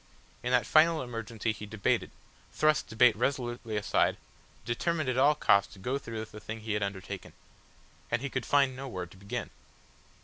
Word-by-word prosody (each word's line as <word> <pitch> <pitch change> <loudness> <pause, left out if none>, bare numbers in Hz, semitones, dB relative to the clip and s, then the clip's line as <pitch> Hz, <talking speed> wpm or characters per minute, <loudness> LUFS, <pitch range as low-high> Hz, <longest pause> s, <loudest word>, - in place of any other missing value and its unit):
In - - -2
that - - +3
final 160 0 +5
emergency 115 -2 -3
he 105 0 -7
debated, 105 -1 0 0.4
thrust 155 0 +2
debate 110 0 +5
resolutely 120 -2 -2
aside, 105 - +2 0.5
determined 155 +5 -1
at 125 - 0
all 145 +3 +5
costs 100 -7 +3
to - - -14
go 130 +8 -1
through 115 -4 -5
with 110 - -8
the 105 - -9
thing 110 +1 -7
he 110 -1 -3
had 105 - 0
undertaken. 100 -1 -5 0.8
And 115 +3 0
he 135 - -2
could 130 -3 -3
find 140 -2 +3
no 135 +1 -6
word 90 -7 -5
to - - -15
begin. 100 +1 -5
115 Hz, 180 wpm, -30 LUFS, 105-135 Hz, 0.8 s, final